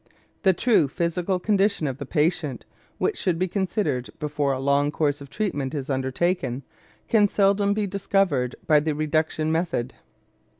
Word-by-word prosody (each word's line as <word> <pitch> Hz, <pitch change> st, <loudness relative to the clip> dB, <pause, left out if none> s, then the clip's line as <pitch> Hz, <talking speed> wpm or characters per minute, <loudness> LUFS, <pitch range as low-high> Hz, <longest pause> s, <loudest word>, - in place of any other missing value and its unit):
The 190 Hz, -3 st, +4 dB
true 210 Hz, -, +3 dB
physical 170 Hz, +5 st, -1 dB
condition 200 Hz, -2 st, +1 dB
of 135 Hz, -1 st, -3 dB
the 140 Hz, -, -6 dB
patient, 155 Hz, -4 st, 0 dB, 0.3 s
which -, -, -1 dB
should 175 Hz, -3 st, 0 dB
be 185 Hz, +2 st, 0 dB
considered 190 Hz, -, -1 dB
before 145 Hz, -2 st, -1 dB
a 130 Hz, -, -1 dB
long 140 Hz, +1 st, +2 dB
course 145 Hz, -1 st, 0 dB
of 140 Hz, -, -10 dB
treatment 145 Hz, -10 st, -2 dB
is 140 Hz, -1 st, -3 dB
undertaken, 130 Hz, +1 st, -1 dB, 0.4 s
can 210 Hz, -3 st, +4 dB
seldom 200 Hz, 0 st, +2 dB
be 210 Hz, -1 st, 0 dB
discovered 190 Hz, -9 st, 0 dB
by 150 Hz, -2 st, +5 dB
the 150 Hz, 0 st, -1 dB
reduction 155 Hz, +1 st, 0 dB
method. 160 Hz, -7 st, -1 dB
160 Hz, 155 wpm, -24 LUFS, 140-190 Hz, 0.4 s, by